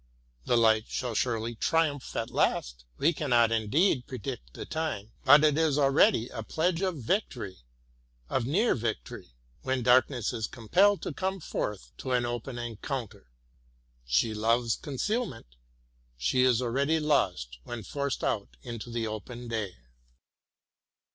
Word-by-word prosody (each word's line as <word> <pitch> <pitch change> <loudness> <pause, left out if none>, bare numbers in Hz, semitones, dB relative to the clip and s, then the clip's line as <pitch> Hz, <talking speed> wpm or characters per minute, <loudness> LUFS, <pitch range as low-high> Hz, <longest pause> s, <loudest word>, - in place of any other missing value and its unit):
The 120 - +3
light 110 -1 +4
shall 125 -2 -3
surely 115 0 -1
triumph 145 +3 0
at - - -2
last; - - 0
— - - -36
we 160 +5 +3
cannot 120 -7 +3
indeed 125 - +2
predict 75 - -6
the - - -6
time, 155 -10 -3
— - - -32
but 145 +2 +8
it 150 0 +4
is 155 -3 +2
already 135 -4 +4
a 115 - -6
pledge 165 - 0
of 185 -4 0
victory, 120 - -2 0.7
of 120 - -1
near 200 - +3
victory, 110 - -5 0.3
when 130 -1 -1
darkness 125 -1 +3
is 110 -3 -2
compelled 185 - +2
to 165 - -3
come 190 +4 -2
forth 105 - -4
to 130 - -2
an 120 -1 +2
open 120 +1 -4
encounter. 120 - -5 0.8
She 65 - +2
loves 115 +2 +2
concealment, 145 - -3 0.3
— - - -38
she 65 - +1
is 125 -1 +3
al 120 - -1
ready 140 +6 +1
lost 90 - 0
when 120 - -6
forced 140 +5 -3
out 100 -3 -2
into 120 -2 -7
the 115 -1 -2
open 115 +3 -6
day. 110 -5 -3
120 Hz, 150 wpm, -29 LUFS, 110-145 Hz, 0.8 s, but